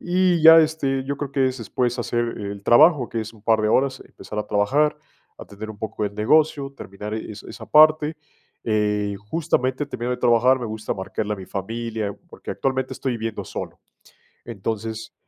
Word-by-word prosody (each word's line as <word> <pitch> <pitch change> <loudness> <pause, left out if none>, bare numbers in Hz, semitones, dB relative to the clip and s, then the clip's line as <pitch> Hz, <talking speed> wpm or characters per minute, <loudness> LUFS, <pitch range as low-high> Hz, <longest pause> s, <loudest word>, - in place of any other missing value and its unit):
Y 180 -2 +2
ya, 160 0 +10
este, 150 -4 +1
yo 140 +1 -3
creo 140 -1 -5
que 135 -1 +2
es 130 0 -2
después 120 +1 -1
hacer 120 0 -2
el 100 -1 -6
trabajo, 130 +1 +5
que 115 - -3
es 110 +1 -7
un 110 -3 -19
par 110 -1 +3
de 110 - +1
horas, 130 +3 +1
empezar 105 - -9
a - - -6
trabajar, 145 +10 +2 0.4
atender 110 +2 -9
un 105 - -11
poco 110 0 -4
el 100 0 -4
negocio, 140 +5 +2
terminar 105 +1 -7
e 110 - -5
esa 105 -1 -10
esa - - -10
parte, 155 0 +5 0.5
eh, 105 -2 0 0.2
justamente, 145 -4 0
termino 125 -3 -4
de 125 - -1
trabajar, 120 +3 +4
me 120 - -4
gusta 110 0 -4
marcarle 105 +2 -3
a - - -10
mi 95 -1 -9
familia, 110 0 -4
porque - - -9
actualmente 130 -1 -2
estoy 130 - -2
viviendo 115 -2 -4
solo. - - -7 0.7
Entonces, 110 0 -5
120 Hz, 185 wpm, -23 LUFS, 105-140 Hz, 0.7 s, ya